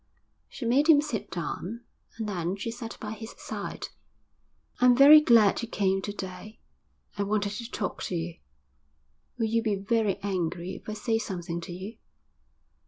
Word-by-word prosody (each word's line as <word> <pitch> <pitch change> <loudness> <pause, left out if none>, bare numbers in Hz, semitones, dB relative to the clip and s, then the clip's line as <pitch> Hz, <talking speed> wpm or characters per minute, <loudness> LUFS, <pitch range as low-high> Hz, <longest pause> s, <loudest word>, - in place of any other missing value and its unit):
She 255 - -7
made 275 +7 +3
him 300 -3 +8
sit 290 -8 -3
down, 190 +6 -4 0.4
and 220 -2 -3
then 180 -2 -2
she 200 +3 -4
sat 230 -1 -7
by 210 - -5
his 220 +1 -8
side. - - -6 0.9
'I'm 250 -1 +6
very 295 +3 +10
glad 230 -8 +5
you 235 - -4
came 195 -3 +1
to 205 - -4
day. 200 +2 -8 0.6
I - - +2
wanted 205 0 0
to 230 +3 -6
talk 205 -5 -4
to 180 - -3
you. 170 0 -4 1.0
Will 230 - +1
you 230 +1 +1
be 215 -3 0
very 205 0 0
angry 180 -2 -2
if - - -9
I - - -3
say 225 +1 0
something 175 -5 -4
to 170 - -8
you?' 190 +6 -7
210 Hz, 170 wpm, -28 LUFS, 190-230 Hz, 1.0 s, very